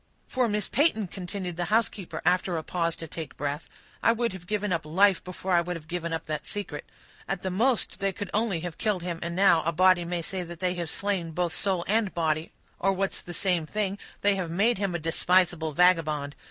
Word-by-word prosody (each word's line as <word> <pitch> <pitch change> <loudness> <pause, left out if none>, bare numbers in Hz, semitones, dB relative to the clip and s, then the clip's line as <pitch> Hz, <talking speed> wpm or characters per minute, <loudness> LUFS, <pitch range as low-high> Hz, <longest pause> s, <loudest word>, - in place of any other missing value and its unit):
"For, 255 -2 +1
Miss 210 -1 0
Peyton," 280 -8 +2
continued 180 -1 -5
the 175 - 0
housekeeper, 195 -5 0
after 180 0 +2
a 160 - -3
pause 170 -1 -1
to 165 - -8
take 160 -2 -7
breath, 145 +2 -3 0.3
"I - - +5
would 235 -2 0
have 180 -2 -10
given 210 -2 0
up 165 - -1
life 185 +4 +3
before 185 +1 -5
I 175 -1 +5
would 180 +1 -3
have 155 -2 -9
given 170 -1 -3
up 165 - -3
that 155 -1 -4
secret. 205 -1 -4 0.4
At 195 -2 -3
the 190 - -1
most, 230 0 +1
they 195 -1 +1
could 195 0 -6
only 210 -6 +1
have 175 -2 -6
killed 205 -5 0
him, 175 -2 -3
and 170 0 -3
now 185 -3 +5
a 165 - 0
body 185 +1 +5
may 170 0 -2
say 190 +2 -3
that 175 -1 -8
they 180 -1 +1
have 170 -3 -3
slain 195 -3 -1
both 175 0 0
soul 190 -4 0
and 215 -1 +2
body; 160 -1 0 0.3
or, 195 - +2
what's 195 +1 -1
the 175 - -8
same 175 -4 +1
thing, 205 +1 -1 0.2
they 205 0 +4
have 180 -3 -2
made 200 +6 +2
him 195 -3 -1
a - - +2
despisable 170 0 +2
vagabond. 155 -4 +3
180 Hz, 220 wpm, -27 LUFS, 165-195 Hz, 0.4 s, I